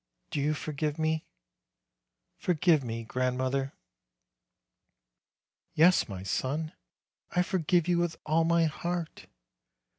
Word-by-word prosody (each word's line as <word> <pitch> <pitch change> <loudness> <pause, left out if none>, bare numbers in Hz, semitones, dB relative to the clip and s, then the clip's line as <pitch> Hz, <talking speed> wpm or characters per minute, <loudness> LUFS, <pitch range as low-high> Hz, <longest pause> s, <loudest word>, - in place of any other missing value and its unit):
Do 145 - -1
you 150 +2 +1
forgive 150 0 -3
me? 160 0 0 1.1
Forgive 165 -3 +2
me, 115 -1 -4
grand 125 +2 -1
mother." 135 +1 -1 2.0
"Yes, 170 -4 +5
my 95 -2 -6
son, 140 - -2 0.6
I 180 - +2
forgive 175 -2 +1
you 175 -1 +2
with 175 -2 -1
all 160 +2 +3
my 170 0 +3
heart. 170 +1 -4
155 Hz, 110 wpm, -29 LUFS, 135-170 Hz, 2.0 s, Yes